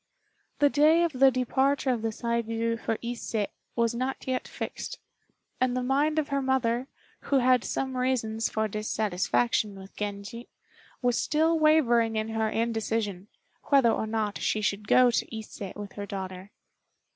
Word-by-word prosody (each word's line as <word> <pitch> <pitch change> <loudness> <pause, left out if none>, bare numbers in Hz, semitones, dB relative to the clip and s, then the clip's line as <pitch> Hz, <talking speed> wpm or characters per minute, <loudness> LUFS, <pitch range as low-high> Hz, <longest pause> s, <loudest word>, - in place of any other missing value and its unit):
The 290 - +4
day 310 +4 +5
of 340 - +1
the 270 +1 +6
departure 265 +2 +1
of 240 -3 -1
the 225 - -1
Saigû 230 0 -1
for 225 - -2
Ise 235 -1 -5 0.4
was 235 0 +1
not 255 +3 -3
yet 255 -1 -2
fixed; - - -6 0.6
and 255 -1 +1
the 250 - -1
mind 285 +4 +1
of 310 -1 0
her 280 -1 0
mother, 260 -1 0 0.4
who 280 - +2
had 255 -1 +4
some 265 -1 -2
reasons 230 -4 0
for 220 0 0
dissatisfaction 200 - 0
with 195 0 -12
Genji, 205 +3 -6 0.5
was 245 -1 +2
still 320 +2 +2
wavering 240 -8 +4
in 215 0 -1
her 220 0 0
indecision, 220 -4 -2 0.4
whether 270 -5 +5
or 220 - -1
not 215 -2 -2
she 215 - 0
should 205 0 -2
go 250 +2 +6
to 230 -1 -2
Ise 220 -1 -10
with 205 -1 -7
her 205 0 -7
daughter. 190 -1 -6
235 Hz, 155 wpm, -27 LUFS, 215-260 Hz, 0.6 s, the